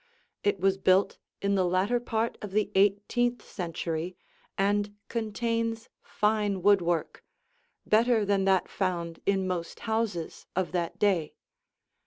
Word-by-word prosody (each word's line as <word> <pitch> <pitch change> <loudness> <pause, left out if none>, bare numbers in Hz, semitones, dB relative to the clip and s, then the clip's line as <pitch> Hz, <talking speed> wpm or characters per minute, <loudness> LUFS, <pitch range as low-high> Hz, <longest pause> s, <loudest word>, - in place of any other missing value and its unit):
It 205 -1 +1
was 195 +1 +2
built 190 +1 +3 0.2
in 200 0 +2
the 190 -2 +3
latter 185 +7 +1
part 230 -1 -1
of 205 -2 -7
the 210 0 +1
eighteenth 210 +4 +2
century 170 -1 -4 0.4
and 205 +1 +1
contains 230 +1 -2
fine 210 -3 0
woodwork, 175 -5 +2 0.6
better 225 0 +3
than 200 -1 +2
that 190 -2 +3
found 170 -3 -2
in 195 -1 +2
most 175 -2 -4
houses 220 -7 -2
of 185 -1 0
that 175 -2 -2
day. 185 -7 +1
200 Hz, 125 wpm, -28 LUFS, 185-220 Hz, 0.6 s, built